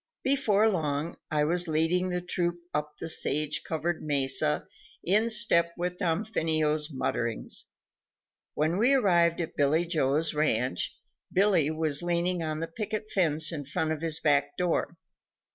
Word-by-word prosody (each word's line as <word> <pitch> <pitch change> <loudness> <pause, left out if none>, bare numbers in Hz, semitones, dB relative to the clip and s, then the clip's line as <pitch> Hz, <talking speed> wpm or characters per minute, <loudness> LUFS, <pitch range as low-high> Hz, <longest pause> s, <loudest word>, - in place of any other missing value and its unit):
Before 225 -6 +3
long, 155 -5 -2
I 150 -1 +1
was 175 +3 +1
leading 165 +4 +1
the 180 0 -2
troop 175 -1 -2
up 150 0 -3
the 165 - -6
sage 150 -1 +1
covered 160 +1 -3
mesa 135 - +1 0.4
in 215 +6 +3
step 170 -7 +4
with 180 +1 -3
Damfino's 160 -5 0
mutterings. 115 -4 -2 0.9
When 155 +4 0
we 245 +5 +4
arrived 175 -9 +3
at 165 - -6
Billy 150 +4 +2
Jones' 155 -1 +1
ranch, 125 - -1 0.3
Billy 185 -6 +3
was 155 -2 0
leaning 175 0 0
on 155 -1 -3
the 165 - -2
picket 215 +4 -5
fence 155 -4 +2
in 150 -3 -4
front 155 +3 -2
of 160 -1 -3
his 165 -1 -1
back 145 -1 +1
door. 180 -2 -1
165 Hz, 145 wpm, -28 LUFS, 150-180 Hz, 0.9 s, step